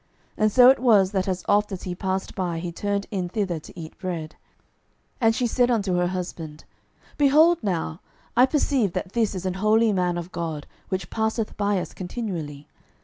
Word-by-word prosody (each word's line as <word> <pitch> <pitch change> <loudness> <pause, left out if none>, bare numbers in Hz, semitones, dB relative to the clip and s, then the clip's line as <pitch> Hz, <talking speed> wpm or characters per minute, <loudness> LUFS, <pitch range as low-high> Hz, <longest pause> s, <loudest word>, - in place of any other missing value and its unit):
And 215 0 +2
so 250 +3 +8
it 270 - 0
was, 210 -7 +4
that 190 -2 -1
as 185 -1 -2
oft 205 +1 +2
as 190 - -6
he 180 - -4
passed 190 +1 -3
by, 175 -3 -2
he 170 +1 -4
turned 200 +3 -2
in 185 -4 -2
thither 185 -4 -2
to 165 +3 -13
eat 160 -1 -8
bread. 170 -5 -4
12:004:009 - - -26 0.8
And 225 -1 +4
she 250 - 0
said 245 +1 +2
unto 205 -6 +1
her 175 0 +2
husband, 170 -4 -6 0.6
Behold 310 +4 +5
now, 170 -4 -2 0.3
I 250 +2 +6
perceive 265 - +1
that 185 - -4
this 225 -3 0
is 185 0 -5
an 185 - 0
holy 220 +1 +4
man 180 -2 0
of 175 +1 -6
God, 160 -3 -4 0.2
which 185 -2 -3
passeth 220 0 -1
by 205 -1 +1
us - - -6
continually. 175 -8 -5
190 Hz, 195 wpm, -24 LUFS, 175-220 Hz, 0.8 s, so